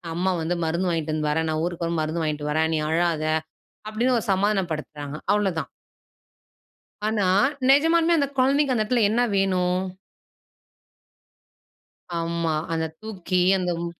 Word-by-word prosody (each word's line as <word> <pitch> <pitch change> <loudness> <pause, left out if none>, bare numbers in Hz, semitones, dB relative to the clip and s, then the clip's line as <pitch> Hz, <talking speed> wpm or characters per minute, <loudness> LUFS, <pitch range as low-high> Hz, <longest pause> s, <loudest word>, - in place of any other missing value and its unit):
அம்மா 185 +2 +1
வந்து 170 +2 -1
மருந்து 170 +3 0
வாங்கிட்டு 160 -2 -1
வந்து 155 -1 -1
வர்றேன் 160 +1 0
நான் 155 0 -1
ஊருக்கு 175 -1 -3
வரும்போது 165 -1 -1
மருந்து 160 +1 -2
வாங்கிட்டு 150 -1 -2
வர்றேன், 160 +1 +1
நீ 155 - 0
அழாத! 165 -1 +1 0.6
அப்படின்னு 235 +4 +1
ஒரு - - -6
சமாதானம் 195 -2 +1
படுத்துறாங்க 150 -1 -5 0.2
அவ்ளோதான். 190 -8 0 1.4
ஆனா, 210 -3 +1 0.4
நிஜமாலுமே 330 +4 +4
அந்த 280 - +1
கொழந்தைக்கு 275 +1 +3
அந்த 215 - +2
எடத்துல 240 0 +2
என்ன 235 +3 +1
வேணும்? 185 -2 +1 2.4
ஆமா. 165 -1 -1 0.2
அத 160 0 -1
தூக்கி 185 -4 -2 0.2
அந்த 180 -1 -1
மு - - -3
175 Hz, 135 wpm, -24 LUFS, 160-215 Hz, 2.4 s, நிஜமாலுமே